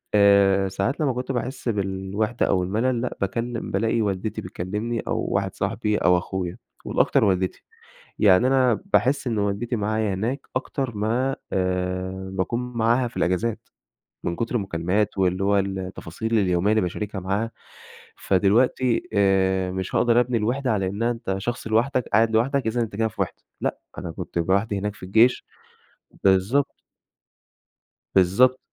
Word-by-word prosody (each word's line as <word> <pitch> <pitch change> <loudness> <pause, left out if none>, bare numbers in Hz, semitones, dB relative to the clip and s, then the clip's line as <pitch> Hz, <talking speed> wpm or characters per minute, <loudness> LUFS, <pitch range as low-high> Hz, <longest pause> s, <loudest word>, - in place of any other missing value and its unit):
آآ، 100 -1 +5
ساعات 100 +10 -2
لما 140 -5 +1
كنت 125 +2 -3
باحس 125 +1 -3
بالوحدة 100 +2 -1
أو 90 -2 +2
الملل 115 +6 0
لأ، 125 - -4
باتكلم 115 +4 -2
بالاقي 115 +3 +1
والدتي 100 +1 -2
بتكلمني 105 +6 -3
أو - - -1
واحد 95 0 -1
صاحبي 105 +1 -1
أو 90 0 +4
أخويا، 90 -1 -4 0.3
والأكتر - - +2
والدتي، 95 -2 0 0.6
يعني 100 +3 +5
أنا 130 -4 +3
باحس 135 +2 +2
إن 115 -3 0
والدتي 100 +4 -1
معايا 110 -1 0
هناك 120 +8 -3
أكتر 130 -3 -2
ما، 120 +6 0 0.2
آآ، 95 0 -2
باكون 95 +6 -1
معاها 120 +2 +2
في 120 - -19
الإجازات 100 +6 -1 0.6
من 85 - -1
كتر 115 +1 -3
المكالمات 95 +1 -1
واللي 95 0 +1
هو 100 0 +3
التفاصيل 95 +3 -2
اليومية 90 +1 +2
اللي 110 - +3
باشاركها 95 +2 -3
معاها. 100 +5 -1 0.7
فدلوقتي 115 +6 +2
آآ، 95 -2 +2
مش 95 0 -4
هاقدر 120 0 +4
أبني 125 0 0
الوحدة 125 +4 0
على 100 -3 0
إنها 115 +5 -1
أنت 115 -5 -3
شخص 120 +4 -4
لوحدك 120 +4 +1
قاعد 110 +2 +3
لوحدك، 125 +4 +1
إذًا 115 +2 0
أنت 110 -3 -3
كده 115 0 +1
في 110 - -11
وحدة، - - -6 0.2
لأ، - - -1 0.2
أنا 85 - -5
كنت 85 - -5
لوحدي 100 +4 +1
هناك 105 +1 -3
في 100 - -18
الجيش 115 +6 +3 0.8
بالضبط. 100 +9 +2 1.3
بالضبط 100 +8 +4
105 Hz, 150 wpm, -24 LUFS, 95-120 Hz, 1.3 s, آآ